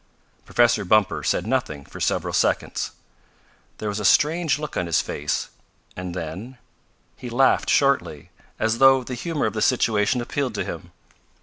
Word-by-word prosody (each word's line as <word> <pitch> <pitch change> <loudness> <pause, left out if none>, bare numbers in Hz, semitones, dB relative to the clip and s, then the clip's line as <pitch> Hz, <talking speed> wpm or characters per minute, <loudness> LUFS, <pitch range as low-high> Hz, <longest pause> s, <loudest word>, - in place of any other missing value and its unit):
Professor 120 -3 +3
Bumper 105 +2 +2
said 90 - 0
nothing 110 - -2
for - - -11
several - - -1
seconds. - - 0 0.9
There 110 - -5
was 105 0 -2
a - - -4
strange 155 - +3
look 150 -1 -6
on 90 - -1
his 85 - +2
face, 75 +1 -3 0.5
and 90 -1 -6
then 95 +9 -6 0.6
he 125 - -8
laughed 130 +3 +2
shortly, 85 - +1 0.3
as 110 +1 0
though 135 -1 +6
the 125 - -6
humor 150 +4 -2
of - - -1
the 110 - -3
situation 115 -1 +2
appealed 125 0 -3
to - - -2
him. - - -7
115 Hz, 160 wpm, -23 LUFS, 95-135 Hz, 0.9 s, though